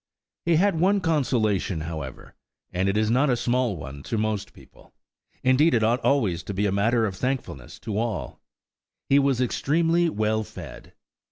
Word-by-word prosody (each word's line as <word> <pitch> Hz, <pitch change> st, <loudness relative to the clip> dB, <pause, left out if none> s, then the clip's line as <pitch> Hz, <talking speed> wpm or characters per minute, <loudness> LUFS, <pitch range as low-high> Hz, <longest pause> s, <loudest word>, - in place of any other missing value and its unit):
He 170 Hz, -, +4 dB
had 180 Hz, 0 st, +2 dB
one 195 Hz, +4 st, +3 dB
consolation, 120 Hz, -, 0 dB
however, 80 Hz, -5 st, -7 dB, 0.4 s
and 95 Hz, +2 st, +1 dB
it 95 Hz, -, 0 dB
is 110 Hz, 0 st, +1 dB
not 135 Hz, +4 st, +3 dB
a 125 Hz, -, +2 dB
small 120 Hz, -4 st, 0 dB
one 70 Hz, -1 st, -8 dB
to 115 Hz, -, -2 dB
most 105 Hz, -1 st, -2 dB
people–indeed 130 Hz, +4 st, -2 dB
it 115 Hz, -, +2 dB
ought 115 Hz, +3 st, +1 dB
always 105 Hz, -12 st, +2 dB
to 95 Hz, +2 st, -6 dB
be 100 Hz, +2 st, 0 dB
a 100 Hz, -, +1 dB
matter 110 Hz, +4 st, +2 dB
of 100 Hz, -3 st, -3 dB
thankfulness 125 Hz, -, -4 dB
to 105 Hz, -2 st, -3 dB
all–he 120 Hz, +4 st, -3 dB
was 135 Hz, -3 st, +2 dB
extremely 165 Hz, +7 st, +1 dB
well 110 Hz, -3 st, 0 dB
fed. -, -, -11 dB
115 Hz, 160 wpm, -25 LUFS, 100-140 Hz, 0.4 s, He